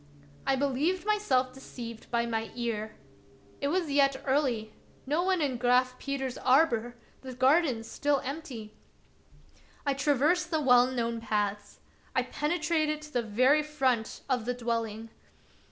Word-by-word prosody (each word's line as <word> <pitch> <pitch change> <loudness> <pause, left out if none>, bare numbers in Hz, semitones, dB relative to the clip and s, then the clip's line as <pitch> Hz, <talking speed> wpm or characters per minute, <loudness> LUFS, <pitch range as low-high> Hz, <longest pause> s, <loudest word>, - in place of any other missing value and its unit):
I 270 - +4
believed 285 +7 0
myself 275 -13 +1
deceived 235 -3 -9
by 235 -1 +1
my 225 -1 -2
ear. 225 -3 -3 0.7
It 280 - +1
was 335 0 0
yet 275 -1 +3
early, 260 -6 0 0.3
no 300 +5 +1
one 370 -3 +1
in 265 -4 -1
Graf 250 +1 +2
Peter's 270 -2 -3
arbor, 245 -3 +3 0.3
the 260 -1 -8
garden 260 -2 +3
still 285 +5 0
empty. 255 -7 -6 1.1
I 280 - +2
traversed 295 +5 +2
the 320 -2 +1
well 250 -3 +5
known 235 -2 -2
paths. 205 -2 -2 0.3
I - - +3
penetrated 305 -1 -1
to 300 - -12
the 245 - +2
very 255 +7 +3
front 265 -7 -1
of 250 -5 0
the 250 0 -1
dwelling. 230 -2 -3
260 Hz, 135 wpm, -29 LUFS, 235-295 Hz, 1.1 s, well